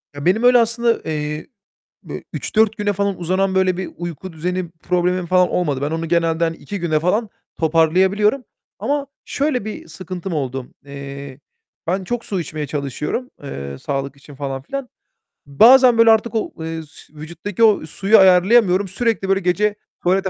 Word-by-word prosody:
Ya, 145 - -6
benim 200 +6 +2
öyle 245 0 +7
aslında, 230 0 +1
eee, 150 0 -3 0.6
bö - - -7
3-4 220 0 +1
güne 205 -2 0
falan 200 -1 -1
uzanan, 190 +2 0
böyle 185 -1 +2
bir 190 - -4
uyku 175 +1 -6
düzeni 180 +2 -3
problemim 180 +1 -1
falan 180 +1 +3
olmadı. 145 -7 -1
Ben 145 - -1
onu 165 +1 -3
genelde 165 0 +1
hani 165 0 -2
2 200 -2 -7
güne 155 -3 +1
falan 205 +6 0 0.3
toparlayabiliyorum. 185 - +2 0.3
Ama 285 0 -1 0.2
şöyle 280 -6 -1
bir 215 -5 -7
sıkıntım 180 +3 -7
oldu: 135 -4 -3 0.2
Eee, 140 -1 -9 0.5
ben 185 +3 -1
çok 240 +4 -3
su 195 -3 -2
içmeye 155 -2 -5
çalışıyorum, 150 - -4
eee, 70 - -6
sağlık 135 - -4
için 140 +1 -15
falan 135 -1 -5
filan. 275 - -5 0.6
Bazen 240 - +6
böyle 230 0 +7
artık 225 +1 +1
o, 220 - -2
eee, 160 0 -4
s 155 - -16
vücuttaki 170 +7 -4
o 210 -7 +4
suyu 195 +7 +3
ayarlayamıyorum, 190 +1 +5
sürekli 205 0 -1
böyle 195 0 +3
gece 200 +3 +1 0.3
tuvalete 190 +2 +2
180 Hz, 165 wpm, -20 LUFS, 155-210 Hz, 0.6 s, öyle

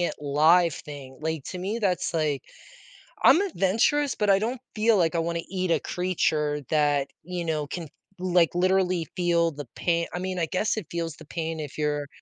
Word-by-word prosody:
it 175 - 0
live 155 +3 +4
thing, 135 -3 -10
like, 160 -3 -3
to 185 - -6
me, 200 +6 -2
that's 185 -5 0
like 150 -4 0 0.8
I'm 360 - +7
adventurous, 285 - +1
but 210 -1 0
I 195 0 +5
don't 240 +3 -2
feel 220 0 +4
like 170 -2 +2
I - - +2
wanna 170 0 -1
eat 185 -2 -1
a - - +3
creature 155 -5 0
that, 145 -2 +2 0.2
you 175 0 -4
know, 155 -2 -1
can, 165 0 -5 0.3
like, 175 -3 +2
literally 185 -2 +2
feel 170 -2 +2
the 145 0 -7
pain 170 -1 0
I 180 - -3
mean, 185 0 -3
I 165 - +2
guess 200 +7 -1
it 195 - -4
feels 165 -2 -3
the 160 - -14
pain 160 0 -4
if 145 -2 -6
you're 150 -1 -1
170 Hz, 190 wpm, -26 LUFS, 155-185 Hz, 0.8 s, I'm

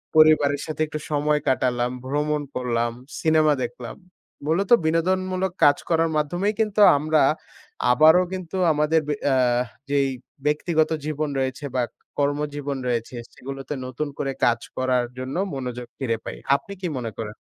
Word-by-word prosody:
পরিবারের 150 -2 +5
সাথে 155 0 -5
একটু 155 0 -5
সময় 150 0 +2
কাটালাম, 125 -2 +1
ভ্রমণ 150 +2 0
করলাম, 120 -2 0 0.3
সিনেমা 155 -1 +4
দেখলাম। 245 - -6 0.5
মূলত 185 +6 0
বিনোদনমূলক 185 +3 0
কাজ 145 -1 +6
করার 165 -1 +2
মাধ্যমেই 175 +8 0
কিন্তু 210 -1 +1 0.2
আমরা 155 +1 +2 0.7
আবারও 160 +8 +6
কিন্তু 185 0 -5 0.2
আমাদের 150 +2 +2
বে 150 - 0
অ্যা 135 -2 +3 0.5
যেই 140 -1 +2 0.4
ব্যক্তিগত 155 +1 +2 0.2
জীবন 155 0 -2
রয়েছে 130 +2 -2
বা, 125 - +2 0.4
কর্মজীবন 145 -1 -1
রয়েছে, 120 0 -2 0.2
সেগুলোতে 135 +2 -7
নতুন 130 +4 -3
করে 135 - -1
কাজ 120 0 +3 0.2
করার 130 -1 +1
জন্য 130 +3 -5 0.2
মনোযোগ 125 -2 -5
ফিরে 115 -4 0
পাই। - - -6 0.2
আপনি 200 +8 -5
কি 180 - -1
মনে 115 -3 -4
করেন? 105 -2 -5
150 Hz, 140 wpm, -24 LUFS, 130-160 Hz, 0.7 s, কাজ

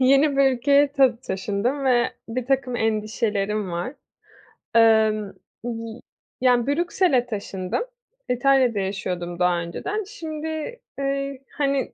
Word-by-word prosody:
yeni 275 +2 +4
bir 275 -1 +5
ülkeye 280 +3 +4
tı 265 -5 +4
taşındım 210 +8 -1
ve 245 -2 +3 0.2
birtakım 255 +1 -1
endişelerim 215 -2 -1
var. 175 +11 -3 0.8
Emm, 220 -2 +4 0.3
y 230 -1 -5 0.4
yani, 250 -1 +3
Brüksel'e 320 -3 +2
taşındım. 200 - -3 0.5
İtalya'da 250 -3 +3
yaşıyordum 180 -3 -3
daha 180 -1 +3
önceden. 390 - -3
Şimdi, 315 +4 -5 0.2
eee, 275 -1 -2 0.2
hani, 275 -2 0
245 Hz, 105 wpm, -23 LUFS, 210-275 Hz, 0.8 s, bir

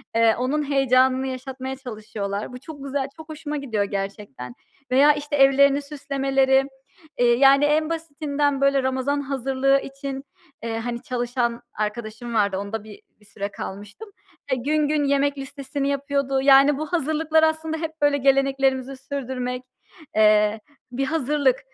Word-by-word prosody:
eee, 230 -1 +4
onun 270 +5 -1
heyecanını 260 -1 +3
yaşatmaya 260 0 -5
çalışıyorlar. 215 -4 -5
Bu 250 - -8
çok 285 -1 -10
güzel, 275 0 -2
çok 320 0 -12
hoşuma 300 -1 -5
gidiyor 225 -7 -1
gerçekten 195 - -5 0.4
veya 285 +4 +6
işte 290 0 -4
evlerini 275 +1 +5
süslemeleri. 270 -2 +1 0.5
Eee, 240 -1 +4
yani, 275 +2 +6
en 305 +1 +2
basitinden 290 -3 -1
böyle 275 -1 +3
Ramazan 265 +2 0
hazırlığı 270 0 +1
için, 275 0 -6 0.4
eee, 225 -1 -3
hani, 235 0 -4
çalışan 245 -2 -2
arkadaşım 215 +2 -4
vardı 200 -3 +1
onda 205 +2 -4
bir 215 -2 -13 0.2
bir 210 - -23
süre 200 0 -6
kalmıştım. 205 - -8 0.4
Eee, 260 - +2
gün 295 +4 +1
gün 300 -1 +1
yemek 280 0 +1
listesini 275 0 -4
yapıyordu. 280 -1 0
Yani, 275 +1 +6
bu 310 - -3
hazırlıklar 315 0 +2
aslında 315 0 0
hep 320 0 -4
böyle 290 -1 +3
geleneklerimizi 270 -1 +1
sürdürmek, 255 -2 -4 0.5
eee, 210 0 +4 0.3
bir 270 +2 -1
hazırlık. 290 -3 +1
270 Hz, 140 wpm, -23 LUFS, 240-285 Hz, 0.5 s, veya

